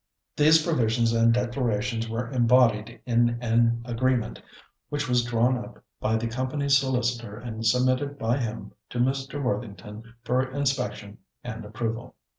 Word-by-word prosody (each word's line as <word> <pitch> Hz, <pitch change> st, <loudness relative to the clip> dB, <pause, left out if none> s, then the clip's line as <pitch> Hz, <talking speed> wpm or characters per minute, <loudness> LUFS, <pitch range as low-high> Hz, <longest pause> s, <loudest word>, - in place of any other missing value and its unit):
These 155 Hz, +2 st, +5 dB
provisions 115 Hz, -7 st, +1 dB
and 115 Hz, 0 st, +4 dB
declarations 115 Hz, -2 st, -1 dB
were 115 Hz, +2 st, -3 dB
embodied 120 Hz, -2 st, +3 dB
in 120 Hz, -1 st, +2 dB
an 115 Hz, 0 st, +2 dB
agreement, 120 Hz, 0 st, -1 dB, 0.5 s
which 145 Hz, 0 st, -2 dB
was 125 Hz, -1 st, +2 dB
drawn 120 Hz, +1 st, +2 dB
up -, -, -12 dB, 0.2 s
by 110 Hz, +1 st, 0 dB
the 110 Hz, +1 st, -1 dB
company's 130 Hz, +4 st, 0 dB
solicitor 125 Hz, -5 st, 0 dB
and 115 Hz, -2 st, -6 dB
submitted 130 Hz, +4 st, +1 dB
by 120 Hz, -1 st, 0 dB
him 115 Hz, -3 st, -4 dB, 0.2 s
to -, -, -6 dB
Mr. 135 Hz, +3 st, -1 dB
Worthington 115 Hz, -1 st, -5 dB
for 125 Hz, +2 st, +1 dB
inspection 130 Hz, -6 st, -2 dB, 0.2 s
and 110 Hz, +1 st, -6 dB
approval. 115 Hz, +3 st, -4 dB
120 Hz, 135 wpm, -26 LUFS, 115-130 Hz, 0.5 s, These